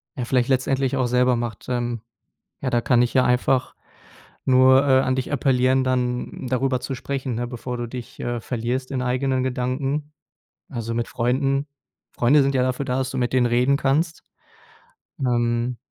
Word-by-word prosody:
ja, 125 - -3
vielleicht 125 0 +1
letztendlich 135 0 +1
auch 130 -2 +1
selber 125 0 +3
macht. 120 -1 -4
Ähm, 120 -2 -2 0.6
ja, 130 - -1
da 120 -1 +1
kann 120 -1 +3
ich 120 - 0
ja 130 -1 +4
einfach 125 +1 +1 0.7
nur, 130 +1 +5
äh, 130 -1 +5
an 130 0 0
dich 130 +2 -3
appellieren, 130 -1 +2
dann 125 0 -2
darüber 130 0 +1
zu 135 - -4
sprechen, 130 -1 -4
ne, 120 +1 -2
bevor 125 +1 -5
du 120 -1 -4
dich, 125 0 -9
äh, 120 -1 -2
verlierst 125 +3 -3
in 130 - -1
eigenen 130 +1 0
Gedanken. 135 +4 -2 0.6
Also 115 -3 -4
mit 120 0 -2
Freunden 135 +4 0 0.5
Freunde 140 +4 +4
sind 135 0 0
ja 130 - +3
dafür 130 +2 -1
da, 130 0 -1
dass 130 -1 -1
du 130 - -4
mit 120 -1 0
denen 130 -1 +3
reden 125 +3 +3
kannst. 150 +4 0 1.0
Ähm, 120 -1 0
130 Hz, 175 wpm, -23 LUFS, 120-135 Hz, 1.0 s, nur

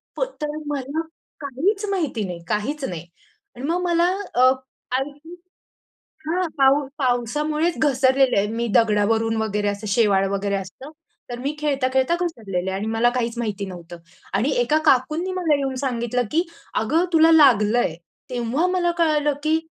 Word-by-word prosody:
प - - -6 0.2
तर 300 0 -3
मला 285 +2 -2 0.4
काहीच 345 - -1
माहिती 310 - -1
नाही, 175 -2 -6
काहीच 260 +9 -2
नाही 170 -2 -6 0.5
आणि 250 - -6
मग 350 +2 0
मला 345 -1 +2 0.3
अ, 245 - +3 0.5
आईची 290 +5 -4 0.9
हां, 355 +3 0
पाऊस 275 +1 +3
पावसामुळेच 300 +7 0
घसरलेलं 265 -3 +3
आहे, 200 +1 +2
मी 230 +2 -2
दगडावरून 225 +1 +2
वगैरे 210 -1 -1
असं 205 +1 -5
शेवाळ 200 -2 +3
वगैरे 200 0 -1
असतं 195 +9 -7 0.4
तर 240 - -5
मी 280 +4 -3
खेळता-खेळता 270 0 +1
घसरलेली 200 - -3
आहे 190 - -2
आणि 210 - -3
मला 230 +2 +3
काहीच 235 -1 -2
माहिती 210 -4 -3
नव्हतं 175 -1 -9 0.4
आणि 225 +9 +1
एका 250 +6 +2
काकूंनी 305 +8 +2
मला 345 -5 +1
येऊन 270 -2 -2
सांगितलं, 245 -2 -1
"की 330 +3 +2 0.4
अगं 315 +11 +1
तुला 325 0 +6
लागलंय." 240 - +4 0.3
तेव्हा 250 +6 -1
मला 360 -1 +1
कळालं 300 -3 +2
की 315 +1 +2
260 Hz, 150 wpm, -22 LUFS, 220-305 Hz, 0.9 s, तुला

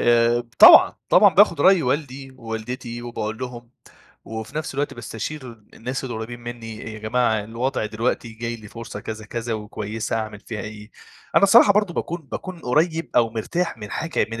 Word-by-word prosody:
آآ، 120 0 +4
ب 120 - -12
طبعًا، - - +9
طبعًا - - +6
باخد 185 -6 +5
رأي 190 +1 +5
والدي 135 0 -2
ووالدتي 120 +1 -6
وباقول 110 -2 -4
لهم، 120 -2 -7 0.5
وفي 110 +4 -7
نفس 155 -3 -3
الوقت 145 +1 -2
باستشير 120 +3 -6 0.2
الناس 125 +3 -5
القريبين 120 -1 -6
منّي 115 -2 -8
أ - - -4
يا 110 0 -8
جماعة 110 -1 0
الوضع 115 +2 -2
دلوقتي 115 +2 -2
جاي 115 +1 -5
لي 110 -2 -13
فرصة 115 -2 -8
كذا 110 +1 -7
كذا 115 +1 -4
وكويسة 105 +1 -4
أعمل 110 -2 -5
فيها 110 -1 -6
إيه؟ 105 0 -9 0.5
أنا - - +6
الصراحة 200 +1 +7
برضه 205 -4 +1
باكون 170 0 -3
باكون 185 -3 -6
قريّب 160 +6 0
أو 115 -2 +4
مرتاح 140 +6 -2
من 105 -1 -8
حاجة 165 +1 -1
من 115 0 -5
120 Hz, 175 wpm, -22 LUFS, 110-135 Hz, 0.5 s, طبعًا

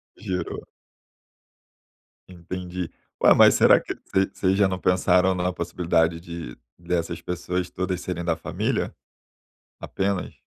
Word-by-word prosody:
Gerou. 90 -1 -4 1.6
Entendi. 90 0 -6 0.3
Ué, - - +7
mas - - +7
será - - +6
que - - -5 0.2
vocês 95 0 +3
vocês 95 0 +1
já 100 -1 +4
não 95 -1 -2
pensaram 90 0 +3
na 90 0 -1
possibilidade 85 -1 0
de 85 -7 -8 0.2
dessas 85 -1 -2
pessoas 90 +1 -3
todas 90 0 -3
serem 90 -2 -4
da 85 -1 +1
família? 80 - -2 0.9
Apenas. 95 -1 -2
90 Hz, 120 wpm, -24 LUFS, 85-95 Hz, 1.6 s, Ué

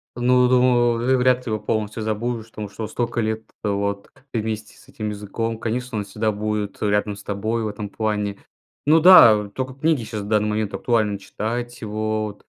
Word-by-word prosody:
Ну, 125 +1 +4
думаю, 125 -1 +4
вы 130 +2 +2
вряд 125 0 +2
ли - - -4
его 110 - -1
полностью 110 +1 -2
забудешь, 115 +1 -3
потому 105 -2 -6
что 110 +2 -6
столько 120 0 -2
лет, 110 0 -1 0.2
вот, 100 -1 -2 0.2
вместе 110 -2 -4
с - - -20
этим 105 -1 -5
языком. 110 +2 -4
Конечно, 120 +1 -3
он 105 - -1
всегда 110 +2 -1
будет 105 0 -3
рядом 105 0 +1
с 100 - -12
тобой 110 +3 -2
в - - -1
этом 105 0 -5
плане. 105 -2 -2 0.5
Ну 160 +2 +6
да, 115 - +8
только 130 +4 -4
книги 145 -2 +1
щас 110 -1 -5
в 100 - -7
данный 105 0 +2
момент 105 -1 -1
актуально 110 -4 +1
читать, 120 +5 -5
вот, 110 -1 -3
110 Hz, 180 wpm, -22 LUFS, 105-120 Hz, 0.5 s, да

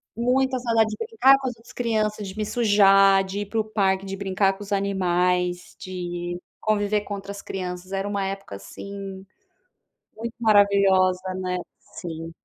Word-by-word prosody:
Muita 260 +2 +1
saudade 230 -2 +2
de 215 - -4
brincar 385 - +5
com 265 - -3
as 245 - -3
outras 230 - -17
crianças, 215 -3 -1
de 190 +3 -9
me 215 - -1
sujar, 195 -4 +5
de 190 +2 -5
ir 205 - -2
para 225 +2 -2
o - - +2
parque, 195 -3 0
de 195 0 -4
brincar 195 0 +1
com 200 - -13
os 200 - -12
animais, 180 -2 0
de 175 -1 -5 0.2
conviver 210 -1 +1
com 205 -1 -5
outras 200 0 -8
crianças. 185 0 -6
Era 195 +1 -2
uma 200 -1 -1
época 195 - -5
assim, 195 - -8 0.9
muito 230 +1 -5
maravilhosa, 195 -3 +3
né. 185 -1 -2 0.2
Sim, 165 -1 -8
195 Hz, 165 wpm, -24 LUFS, 185-215 Hz, 0.9 s, brincar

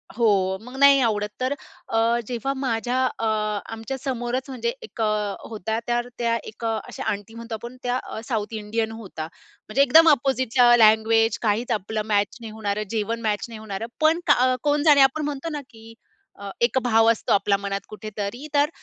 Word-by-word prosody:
हो, 195 -5 +2
मग 250 +3 -11
नाही 280 -1 +7
आवडत 210 -3 0
तर 260 +2 +1 0.3
अ, 225 - -1 0.3
जेव्हा 250 +2 -2
माझ्या 250 -2 -1 0.2
अ, 225 - -1 0.5
आमच्या 225 +4 -5
समोरच, 255 0 -2
म्हणजे 470 - -2
एक 440 - -8
अ, 210 -2 0
होता 220 +1 -3
तर 240 0 0
त्या 235 -1 +1 0.2
एक 230 - -8
अ, 225 -1 0
अशा - - -7
आंटी 205 +2 -6
म्हणतो 230 0 -6
आपण 235 +3 -9
त्या 250 +1 0 0.3
साउथ 220 -2 -2
इंडियन 220 +1 -2
होत्या. 205 -8 -7 0.4
म्हणजे, 255 +6 +1
एकदम 320 +5 +7
अपोझिटच्या 260 -3 +4
लँग्वेज, 220 0 +4
काहीच 225 +2 0
आपलं 215 0 -1
मॅच 205 -1 +1
नाही 225 -2 -7
होणारं, 210 -1 -2
जेवण 225 +1 -2
मॅच 210 -2 -1
नाही 225 - -8
होणारं, 215 0 -5
पण 315 +2 +4
का - - +7
अ, 255 +1 +2
कोण 290 0 +2
जाणे 295 -3 +6
आपण 270 +3 +3
म्हणतो 295 +2 -4
ना 295 -1 -4
की, 225 -1 -14 0.5
अ, 200 0 -7
एक 235 +2 +2
भाव 225 -2 +4
असतो 230 - 0
आपला 200 0 +2
मनात 200 0 -3
कुठेतरी 215 +5 -6
तर 290 0 +3
230 Hz, 180 wpm, -24 LUFS, 215-255 Hz, 0.5 s, नाही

